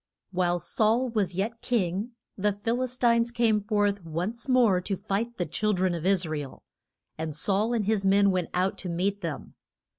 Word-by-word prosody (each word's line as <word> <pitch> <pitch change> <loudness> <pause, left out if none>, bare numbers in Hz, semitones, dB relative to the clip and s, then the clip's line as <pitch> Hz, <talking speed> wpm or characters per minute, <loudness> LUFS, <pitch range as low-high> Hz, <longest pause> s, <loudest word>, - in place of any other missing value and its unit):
WHILE 175 -1 +1
Saul 225 +7 +1
was 200 -6 -1
yet 225 +5 -2
king, 210 0 -1 0.2
the 210 +1 +1
Phil 225 +5 -2
is 255 -1 -3
tines 235 -1 +3
came 230 -3 +2
forth 205 -2 0
once 180 - -3
more 235 -8 +4
to 195 +1 -3
fight 215 +4 -3
the 175 - -1
chil 210 +7 0
dren 185 -1 +1
of 170 +1 -2
Is 190 -2 +3
ra 155 -1 -3
el. 140 -3 -9 0.6
And 160 -2 -3
Saul 200 +8 +1
and 225 -4 0
his 210 -1 +1
men 200 +1 +4
went 180 -2 -1
out 185 +2 0
to 180 - -4
meet 195 +4 -1
them. 165 -6 -5
200 Hz, 190 wpm, -27 LUFS, 180-225 Hz, 0.6 s, more